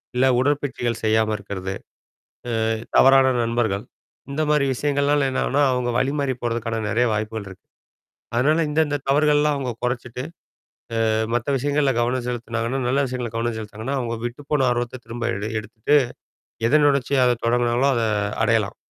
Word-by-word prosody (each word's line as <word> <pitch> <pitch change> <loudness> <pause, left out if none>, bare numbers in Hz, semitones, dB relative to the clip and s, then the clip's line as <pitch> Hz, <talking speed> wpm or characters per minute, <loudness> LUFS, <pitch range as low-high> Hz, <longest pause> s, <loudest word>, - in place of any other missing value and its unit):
இல்லை 130 +1 +4
உடற்பயிற்சிகள் 130 -4 -1
செய்யாம 110 0 +2
இருக்கறது. 95 -1 -5 0.9
அ - - +1 0.3
தவறான 135 -1 +6
நண்பர்கள், 115 -4 0 0.5
இந்த 155 +3 -1
மாதிரி 150 -2 +3
விஷயங்கள்னால 140 +1 +1
என்னாகும்ன்னா, 140 +2 +1
அவுங்க 125 -1 -1
வழி 135 +1 +1
மாறி 135 -3 0
போறதுக்கான 115 -1 -2
நெறையா 120 +2 +2
வாய்ப்புகள் 110 -1 -3
இருக்கு. 95 - -14 0.7
அதனால 155 +7 +3
இந்த 150 +2 0
இந்த 145 0 -1
தவறுகள்லாம் 150 +1 +3
அவங்க 130 -3 -3
கொறைச்சிட்டு, 125 0 -3 0.9
அ - - +2 0.2
மத்த 120 -1 -1
விஷயங்கள்ல 140 0 +1
கவனம் 125 +1 -1
செலுத்துனாங்கன்னா 120 +1 -2
நல்ல 135 +2 +1
விஷயங்கள்ல 120 -3 -4
கவனம் 115 -1 -1
செலுத்துனாங்கன்னா, 110 +5 -5
அவுங்க 115 -1 -3
விட்டு 120 +4 -8
போன 135 -3 +3
ஆர்வத்த 120 +1 -3
திரும்ப 120 +1 -3
எடு 105 +2 -4
எடுத்துட்டு, 110 +6 0 0.7
எத 155 - +5
நெனச்சு 140 -1 +2
அத 120 -1 +2
தொடங்குனாங்களோ 120 +3 +2
அத 115 - +1 0.4
அடையலாம். 110 -3 +1
125 Hz, 145 wpm, -22 LUFS, 115-140 Hz, 0.9 s, தவறான